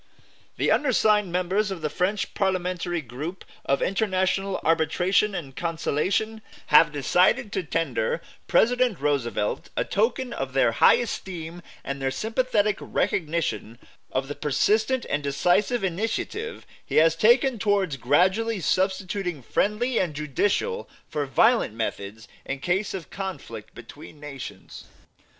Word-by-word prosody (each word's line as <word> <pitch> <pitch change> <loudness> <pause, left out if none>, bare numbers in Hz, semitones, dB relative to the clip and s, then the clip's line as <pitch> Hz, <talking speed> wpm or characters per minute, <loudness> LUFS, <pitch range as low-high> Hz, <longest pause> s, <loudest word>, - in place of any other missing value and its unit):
"The - - +1
undersigned 215 -8 +3
members 185 +4 0
of 190 -4 -5
the - - +1
French 195 +3 -1
Parliamentary 180 -2 -1
Group 145 +9 -7 0.2
of 140 - +1
International 195 -1 0
Arbitration 175 +5 +2
and 140 -7 -6
Conciliation 175 +6 -1 0.3
have 155 +1 +7
decided 180 - +2
to - - -1
tender 480 - -1 0.3
President 245 - +3
Roosevelt 130 -7 -1
a - - +1
token 240 +4 0
of 135 -1 -4
their 135 -3 +3
high - - +6
esteem 175 -7 -5 0.2
and 140 0 -5
their 135 - +1
sympathetic 215 - 0
recognition 150 - -1 0.3
of 135 +1 -1
the 145 - -4
persistent 215 - +1
and 145 - -1
decisive 180 - +1
initiative 225 - -3 0.2
he - - -6
has 160 +1 +5
taken 240 +5 +4
towards 200 -8 +1
gradually 190 - +2
substituting 185 -3 -1
friendly 225 - 0
and 170 -5 -1
judicial 195 - -1 0.2
for 145 -2 -3
violent 225 - +3
methods 110 0 -4 0.2
in 140 - -4
case 190 +7 -1
of 180 -4 -8
conflict 175 - -7
between 125 +5 -12
Nations. 135 -9 -9
180 Hz, 125 wpm, -25 LUFS, 145-210 Hz, 0.3 s, have